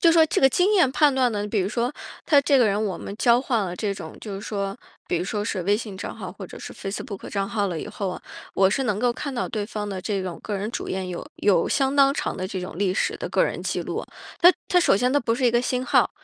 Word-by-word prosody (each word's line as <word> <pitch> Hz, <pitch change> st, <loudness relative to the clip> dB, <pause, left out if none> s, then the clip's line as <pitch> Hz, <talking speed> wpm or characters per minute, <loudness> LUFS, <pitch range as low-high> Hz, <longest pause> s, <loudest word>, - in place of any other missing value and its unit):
就 335 Hz, -2 st, +6 dB
说 325 Hz, -1 st, +6 dB
这 -, -, 0 dB
个 270 Hz, -, +7 dB
经 375 Hz, +9 st, +2 dB
验 345 Hz, -9 st, +5 dB
判 290 Hz, +1 st, +4 dB
断 255 Hz, -2 st, +2 dB
呢？ 205 Hz, -1 st, -2 dB
比 215 Hz, -, 0 dB
如 185 Hz, -, 0 dB
说 240 Hz, +4 st, -1 dB, 0.3 s
他 290 Hz, -, +6 dB
这 280 Hz, -1 st, +4 dB
个 240 Hz, -, +5 dB
人 205 Hz, +1 st, +1 dB
我 200 Hz, -4 st, -2 dB
们 200 Hz, -, -7 dB
交 235 Hz, +1 st, +4 dB
换 235 Hz, -5 st, 0 dB
了 180 Hz, -1 st, -4 dB
这 200 Hz, +2 st, -2 dB
种， 160 Hz, -4 st, -8 dB
就 205 Hz, -3 st, -6 dB
是 195 Hz, -, -5 dB
说 200 Hz, -2 st, -3 dB, 0.3 s
比 175 Hz, -, +1 dB
如 175 Hz, -, -1 dB
说 205 Hz, +1 st, -2 dB
是 195 Hz, -4 st, -2 dB
微 200 Hz, +3 st, +3 dB
信 210 Hz, -3 st, -4 dB
账 190 Hz, -, -6 dB
号 -, -, -7 dB
或 -, -, -9 dB
者 -, -, -10 dB
是 -, -, -8 dB
Facebook 195 Hz, 0 st, -6 dB
账 195 Hz, -1 st, -1 dB
号 205 Hz, -1 st, 0 dB
了 165 Hz, -3 st, -3 dB
以 -, -, -6 dB
后 195 Hz, -3 st, -3 dB
啊， -, -, -6 dB, 0.3 s
我 190 Hz, 0 st, +4 dB
是 270 Hz, -, 0 dB
能 210 Hz, -5 st, 0 dB
够 245 Hz, +1 st, +2 dB
看 275 Hz, +3 st, -4 dB
到 240 Hz, -, -2 dB
对 215 Hz, -2 st, -2 dB
方 210 Hz, -1 st, -5 dB
的 195 Hz, -2 st, -4 dB
这 195 Hz, -1 st, -1 dB
种 180 Hz, -2 st, -5 dB
个 210 Hz, -, -3 dB
人 210 Hz, +3 st, -3 dB
主 -, -, -4 dB
页 190 Hz, 0 st, -2 dB
有 180 Hz, -1 st, -6 dB
有 190 Hz, -5 st, +3 dB
相 270 Hz, 0 st, +1 dB
当 275 Hz, -1 st, +6 dB
长 -, -, -3 dB
的 185 Hz, -, -3 dB
这 185 Hz, -1 st, -4 dB
种 180 Hz, -2 st, -7 dB
历 195 Hz, -2 st, +1 dB
史 -, -, 0 dB
的 -, -, -5 dB
个 -, -, +3 dB
人 -, -, -1 dB
记 -, -, -1 dB
录， -, -, -4 dB, 0.4 s
它 355 Hz, +2 st, +9 dB, 0.2 s
它 360 Hz, -, +4 dB
首 345 Hz, -, +4 dB
先 250 Hz, +6 st, +2 dB
它 290 Hz, -, +3 dB
不 230 Hz, -3 st, 0 dB
是 255 Hz, -, -1 dB
一 -, -, +4 dB
个 240 Hz, +1 st, +2 dB
新 250 Hz, 0 st, -1 dB
号。 -, -, +3 dB
210 Hz, 340 characters per minute, -24 LUFS, 195-255 Hz, 0.4 s, 它